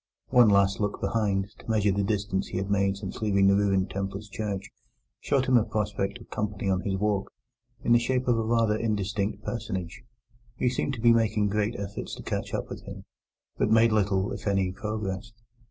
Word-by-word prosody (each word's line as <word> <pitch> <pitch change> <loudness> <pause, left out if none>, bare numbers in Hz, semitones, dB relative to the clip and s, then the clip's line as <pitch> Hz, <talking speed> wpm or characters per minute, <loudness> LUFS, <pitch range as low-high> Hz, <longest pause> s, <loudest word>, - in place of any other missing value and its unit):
One 120 -3 +6
last 100 -1 +3
look 105 -1 -1
behind, 100 -3 0
to - - -12
measure 105 -2 +3
the 100 +1 0
distance 100 -1 -1
he 90 - -4
had 95 +1 -2
made 100 -1 +2
since 100 0 -7
leaving 100 -2 +3
the 100 0 +5
ruined 95 -2 +1
Templars' 100 +2 -4
church, 100 -2 -4 0.5
showed 135 0 +1
him 130 -1 +5
a 115 - +4
prospect 105 -2 -2
of - - -16
company 105 -2 -2
on 95 -1 +1
his 95 -3 -1
walk, 100 -1 0 0.5
in - - +1
the 120 - +7
shape 130 +2 -1
of 120 - +4
a 115 - 0
rather 115 -1 +2
indistinct 105 -1 -1
personage, 95 -7 -4 0.6
who 125 - +2
seemed 135 +2 -1
to 115 - -7
be 120 0 +6
making 110 -2 +2
great 105 +2 0
efforts 100 -1 -5
to - - -10
catch - - -3
up - - -3
with - - -7
him, - - -9 0.5
but - - +2
made 115 +1 +5
little, 100 -2 +1
if - - -5
any, 95 -2 +1
progress. 105 +1 -4
105 Hz, 200 wpm, -27 LUFS, 100-110 Hz, 0.6 s, the